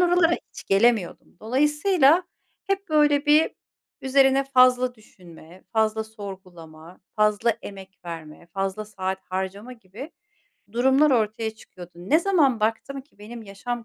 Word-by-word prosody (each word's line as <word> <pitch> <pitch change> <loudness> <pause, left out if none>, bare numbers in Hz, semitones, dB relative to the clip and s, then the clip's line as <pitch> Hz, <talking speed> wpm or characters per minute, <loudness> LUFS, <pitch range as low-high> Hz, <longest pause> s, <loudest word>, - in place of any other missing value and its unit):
oralara 350 -1 +3 0.2
hiç - - -12
gelemiyordum. 205 -3 +1
Dolayısıyla 295 - +3 0.4
hep, 395 0 -2
böyle, 295 -1 +3
bir 305 +2 +4 0.5
üzerine 270 0 +3
fazla 255 -2 +3
düşünme, 180 -5 -17
fazla 220 0 +1
sorgulama, 185 -6 -12 0.2
fazla 215 +2 +2
emek 195 -1 -11
verme, 165 -1 -9
fazla 195 +4 -4
saat 190 -2 -4
harcama 190 +5 -4
gibi 230 - -11 0.6
durumlar 265 +5 +3
ortaya 220 -2 0
çıkıyordu. 180 -5 -14
Ne 185 - +1
zaman 310 - +2
baktım 225 +5 -2
ki 275 -6 -34
benim 225 +2 -10
yaşam 230 +4 -6
225 Hz, 120 wpm, -24 LUFS, 195-275 Hz, 0.6 s, bir